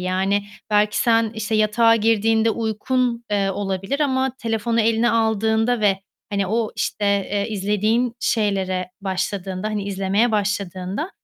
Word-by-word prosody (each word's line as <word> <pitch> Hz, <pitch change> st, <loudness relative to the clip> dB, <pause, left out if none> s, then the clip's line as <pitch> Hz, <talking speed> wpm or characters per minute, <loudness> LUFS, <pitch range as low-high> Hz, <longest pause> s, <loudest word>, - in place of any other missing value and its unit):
yani 190 Hz, +2 st, 0 dB, 0.2 s
belki 210 Hz, 0 st, +2 dB
sen, 230 Hz, -1 st, +3 dB
işte, 220 Hz, 0 st, -3 dB
yatağa 225 Hz, +2 st, +4 dB
girdiğinde 225 Hz, 0 st, +2 dB
uykun, 235 Hz, +2 st, -1 dB
eee, 200 Hz, -1 st, +1 dB
olabilir 195 Hz, +7 st, -3 dB
ama 265 Hz, -2 st, +1 dB
telefonu 230 Hz, 0 st, 0 dB
eline 225 Hz, +1 st, +2 dB
aldığında 220 Hz, +1 st, +1 dB
ve, 195 Hz, -2 st, +2 dB, 0.3 s
hani, 200 Hz, -1 st, 0 dB
o, 220 Hz, +2 st, 0 dB
işte, 210 Hz, -, -2 dB, 0.3 s
eee, 205 Hz, +1 st, -1 dB
izlediğin 215 Hz, +4 st, 0 dB
şeylere 190 Hz, -4 st, 0 dB
başladığında, 190 Hz, 0 st, -3 dB
hani 210 Hz, -2 st, -3 dB
izlemeye 200 Hz, +4 st, +1 dB
başladığında 200 Hz, -, -2 dB
215 Hz, 130 wpm, -21 LUFS, 195-230 Hz, 0.3 s, yatağa